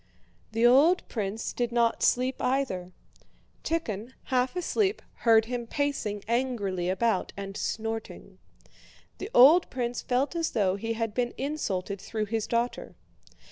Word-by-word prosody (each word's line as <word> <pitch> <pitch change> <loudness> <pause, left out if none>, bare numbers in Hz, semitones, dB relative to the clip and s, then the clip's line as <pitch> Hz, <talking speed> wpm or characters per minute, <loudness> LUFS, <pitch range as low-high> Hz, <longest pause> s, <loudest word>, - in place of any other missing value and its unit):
The 225 +2 +2
old 290 +9 +5
prince 210 -1 -3
did 240 -1 -1
not 235 -1 +1
sleep 255 +1 +1
either. 250 -9 -1 0.7
Tíkhon, 250 -8 -3
half 255 +2 0
asleep, 385 +3 0 0.3
heard 225 -1 +6
him 240 0 -4
pacing 230 -8 -2
angrily 220 -7 -1
about 190 +1 0
and 195 0 -6
snorting. 225 +1 -5 0.8
The 395 - -5
old 300 +8 +7
prince 245 -1 -3
felt 260 +6 0
as 330 -1 -1
though 195 -5 +2
he 225 +3 -3
had 225 -1 -2
been 240 +1 -1
insulted 200 -9 -3
through 215 -1 -3
his 220 +1 -2
daughter. 235 +1 -2
235 Hz, 135 wpm, -28 LUFS, 210-260 Hz, 0.8 s, old